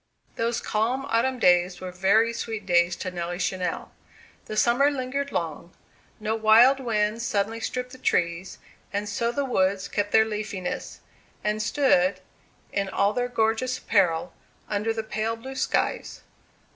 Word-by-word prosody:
Those 230 0 -1
calm 240 +5 -1
autumn 255 +2 +1
days 180 -4 +3
were 185 -1 -6
very 200 +6 +3
sweet 220 -3 -5
days 175 -1 +3
to 185 - -5
Nelly 175 0 -4
Channell. 180 -1 -2 0.6
The 215 - -6
summer 245 +6 +4
lingered 280 0 -3
long; 170 +1 -4 0.5
no 215 +1 -1
wild 225 +5 +6
winds 225 -2 0
suddenly 215 0 -1
stripped 250 +2 -4
the 260 - -12
trees, 170 -3 -1 0.3
and 205 +1 -2
so 235 +3 -1
the 280 +3 -1
woods 195 -5 +1
kept 205 0 -2
their 220 0 +5
leafiness, 210 -4 -5 0.4
and 210 +1 0
stood, 200 -7 +2 0.5
in 195 -1 -1
all 200 +2 +1
their 245 +1 -1
gorgeous 235 +2 0
apparel, 175 -4 +1 0.3
under 210 +2 -1
the 225 0 -3
pale 220 +1 -2
blue 260 +4 -9
skies. 260 - -1
215 Hz, 145 wpm, -25 LUFS, 190-235 Hz, 0.6 s, wild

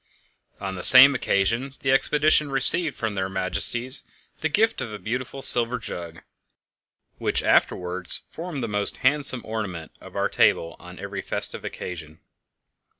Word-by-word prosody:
On 95 -1 -6
the 90 - -7
same 130 +6 +8
occasion 120 +3 -2
the 130 - 0
expedition 150 +2 +2
received 135 +3 +2
from 110 -2 -4
their 95 -1 -4
Majesties 115 +7 -3 0.4
the 160 - -2
gift 220 +8 0
of 115 - -6
a 105 - -7
beautiful 125 +6 -5
silver 120 +1 +6
jug, 85 -7 -9 1.0
which - - -1
afterwards 90 0 0
formed 165 -5 -7
the - - -3
most 105 -1 -2
handsome 135 -2 +4
ornament 100 -7 -6
of - - -14
our - - 0
table 85 -1 0
on - - -13
every - - -7
festive - - -4
occasion. 80 -3 -9
115 Hz, 145 wpm, -23 LUFS, 95-135 Hz, 1.0 s, same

